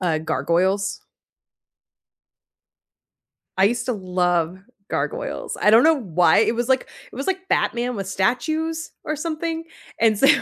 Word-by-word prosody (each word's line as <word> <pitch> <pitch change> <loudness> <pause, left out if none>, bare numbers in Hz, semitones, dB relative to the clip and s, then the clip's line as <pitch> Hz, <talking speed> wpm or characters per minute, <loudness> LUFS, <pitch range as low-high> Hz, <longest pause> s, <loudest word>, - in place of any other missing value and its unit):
uh, 170 -4 +1
Gargoyles? 180 +5 0 2.6
I 190 - +5
used 235 +6 +1
to 250 - 0
love 180 -3 0 0.3
Gargoyles. - - -3
I 210 - +5
don't 225 +2 +7
know 320 -1 +4
why 175 -6 +3
it - - +3
was 240 +1 -2
like 260 -1 +1 0.2
it - - -11
was 275 - -4
like 380 0 -2
Batman 240 0 0
with 195 - -4
statues 315 - -1
or 310 - -3
something, 325 +1 -3 0.4
and 220 -1 +4
so 275 - +5
230 Hz, 140 wpm, -22 LUFS, 185-310 Hz, 2.6 s, don't